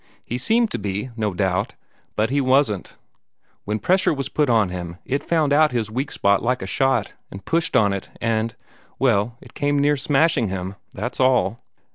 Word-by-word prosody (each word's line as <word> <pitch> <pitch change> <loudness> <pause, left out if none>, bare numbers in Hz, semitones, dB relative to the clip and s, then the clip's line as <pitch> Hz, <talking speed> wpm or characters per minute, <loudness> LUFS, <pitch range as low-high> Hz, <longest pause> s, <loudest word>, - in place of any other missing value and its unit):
He 120 - -3
seemed 225 - +2
to - - -3
be, 100 +5 -3
no 110 -3 -1
doubt, 95 -1 0 0.4
but 110 +3 +1
he 140 +1 +2
wasn't. 130 -6 +1 0.7
When 105 +1 -1
pressure 185 - +2
was 135 -3 -3
put 150 -3 +1
on 110 -5 +3
him, 90 -1 -6
it 140 +2 -1
found 155 -4 +1
out 150 -1 +4
his 110 -3 -1
weak 130 +5 -2
spot 100 0 +2
like 125 +2 0
a - - -3
shot, 135 -6 0 0.2
and 95 0 -10
pushed 165 0 0
on 100 -3 +4
it, 100 - -5
and 115 0 -1 0.4
well, 115 -2 +1
it - - -15
came 145 -1 0
near 145 +1 +3
smashing 135 -2 +2
him, 95 0 -4 0.2
that's 115 +6 -5
all." 130 -3 +2
120 Hz, 185 wpm, -22 LUFS, 105-140 Hz, 0.7 s, out